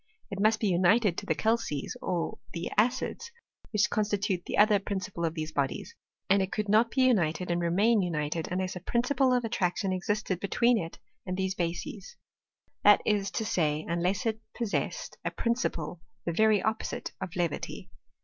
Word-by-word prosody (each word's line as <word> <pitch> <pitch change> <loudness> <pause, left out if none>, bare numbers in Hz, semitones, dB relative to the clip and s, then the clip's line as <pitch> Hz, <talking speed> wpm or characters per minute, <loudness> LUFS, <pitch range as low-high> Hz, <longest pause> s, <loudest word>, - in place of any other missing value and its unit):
It 195 0 -3
must 215 +1 +4
be 215 - +1
united 190 +2 +3
to - - -11
the 160 - +2
calces 220 -11 -1
or 175 -2 -2
the 170 0 -4
acids, 255 - 0 0.4
which 210 -1 +3
constitute 205 -3 0
the - - -2
other 210 -1 +6
principle 190 -2 -4
of 165 0 -2
these 155 -1 -3
bodies; 140 -3 -2 0.3
and 195 +1 +4
it 190 - -2
could 210 -1 -2
not 220 +3 +4
be 260 +2 +2
united, 180 -8 +2
and 175 0 0
remain 200 +6 +3
united, 160 -2 -2
unless 185 +1 -1
a - - -4
principle 255 +7 +1
of 250 -1 +2
attraction 185 -3 0
existed 195 -1 -1
between 235 +4 +2
it 165 -3 -6 0.3
and 185 0 -2
these 190 0 0
bases; 175 +2 -4 0.7
that 205 0 +7
i3 205 -2 +1
to 220 +4 -2
say, 155 -6 0
unless 175 +6 0
it 220 -1 0 0.2
possessed 230 -4 -2
a - - 0
principle 180 -9 -2 0.2
the 170 - -1
very 215 +2 +4
oppo 220 0 0
site - - -4
of 185 -3 -5
levity. 175 -4 -3
195 Hz, 175 wpm, -29 LUFS, 175-220 Hz, 0.7 s, that